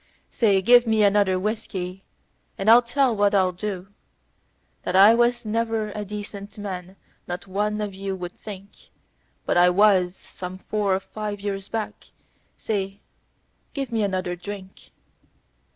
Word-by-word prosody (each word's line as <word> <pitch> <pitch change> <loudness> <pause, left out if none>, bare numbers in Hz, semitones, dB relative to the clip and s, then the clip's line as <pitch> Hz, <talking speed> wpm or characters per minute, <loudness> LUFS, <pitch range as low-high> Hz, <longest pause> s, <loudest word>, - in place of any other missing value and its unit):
Say! 200 -5 +2
Give 245 +3 +6
me 220 -1 +3
another 200 -2 +3
whiskey, 195 -3 -4 0.5
and 210 +3 +4
I'll 235 +1 +9
tell 245 0 +1
what 205 0 +2
I'll 185 -2 +3
do 190 0 -5 0.9
That 180 - -3
I 200 +4 +8
was 240 0 +2
ever 225 -1 -1
a 210 +1 -4
decent 205 0 -8
man 190 -2 -6 0.3
not 175 +2 -5
one 210 +2 -1
of 205 -2 -3
you 195 0 -4
would 180 -1 -6
think; 200 -2 -11 0.6
But - - +1
I 175 0 +6
was, 185 -1 +4
some 180 0 -8
four 200 0 0
or - - -1
five 210 +1 -6
years 195 -1 -4
back. 225 -2 -5 0.5
Say, 200 -2 -3 0.7
give 275 -3 -3
me 225 -1 0
another 185 -3 -1
drink. 190 +1 -9
200 Hz, 145 wpm, -24 LUFS, 190-215 Hz, 0.9 s, I'll